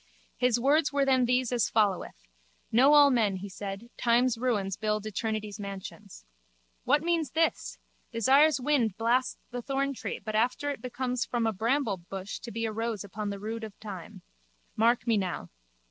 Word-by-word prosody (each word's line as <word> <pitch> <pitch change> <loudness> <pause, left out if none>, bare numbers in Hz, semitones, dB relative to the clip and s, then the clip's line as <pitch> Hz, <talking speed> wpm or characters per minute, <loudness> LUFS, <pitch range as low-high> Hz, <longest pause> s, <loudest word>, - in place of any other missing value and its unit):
His 245 -1 +2
words 295 +5 +3
were 280 -1 +2
then 260 -2 +3
these 250 0 +1
as 240 -3 +1
followeth: 195 - 0 0.5
Know 265 +6 +6
all 290 -1 +7
men, 220 -6 +2
he 190 +2 -6
said, 200 +4 -7
time's 240 +1 +3
ruins 215 -6 -1
build 215 0 -1
eternity's 215 0 -3
mansions. 200 - -8 0.6
What 290 +4 +3
means 335 -4 0
this? 325 +4 0 0.3
Desire's 275 +6 +4
wind 250 -7 +1
blasts 240 +3 +1
the 245 0 -4
thorntree 275 +1 -2
but 215 - -6
after 245 +6 +1
it 280 - -7
becomes 250 0 -2
from 240 -3 -1
a 225 - +1
bramblebush 200 -5 -2
to 235 - -8
be 230 +2 -2
a 220 - -2
rose 225 -2 -3
upon 205 +1 -5
the 200 - -4
rood 220 +3 -5
of 215 -2 -9
time. 195 -6 -9 0.5
Mark 230 +2 +3
me 230 -3 +2
now. 180 - -3
230 Hz, 165 wpm, -29 LUFS, 210-255 Hz, 0.6 s, all